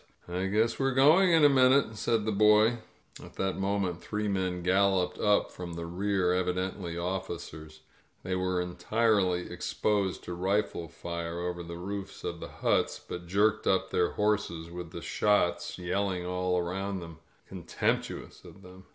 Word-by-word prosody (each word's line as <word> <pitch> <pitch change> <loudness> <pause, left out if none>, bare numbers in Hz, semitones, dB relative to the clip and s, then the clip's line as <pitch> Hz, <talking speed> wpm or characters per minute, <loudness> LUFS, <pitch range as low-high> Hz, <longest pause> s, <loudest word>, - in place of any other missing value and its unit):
^ 95 +2 -2
guess 110 +3 +1
we're 135 -1 +1
going 160 +8 +6
in 160 -3 +6
a - - +10
minnte," 130 -3 +4
said 110 0 0
the 110 - 0
boy. 105 +3 +4 0.4
At - - -13
that 95 0 -2
moment 95 -3 -1
three 105 0 -3
men 95 -3 -1
gaJloped 95 -1 +2
up 105 -1 +3
from 90 -1 -7
the 85 0 -5
rear, 90 +1 0
evidently 90 -1 -2 0.4
cheers. 80 -1 -11 0.4
They 95 0 -2
were 90 0 0
entirely 90 +1 +1
exposed 100 -3 -1
to 90 - -6
rifle 95 -1 -1
fire 85 0 -5
over 90 0 -3
the 85 0 -7
roofs 100 +2 -6
of - - -4
the - - -6
huts, - - 0
bat 90 0 -8
jerked 105 +4 +2
up 95 - +1
their - - +1
horses 100 -6 -1
with 90 -1 -7
the 85 -1 -8
shots 100 -4 +1
yelling 90 0 -1
all 90 0 0
aroand, 90 -2 -4 0.3
contemptuous - - -3
of 95 - -14
them. 90 +1 -14
95 Hz, 155 wpm, -29 LUFS, 90-105 Hz, 0.4 s, a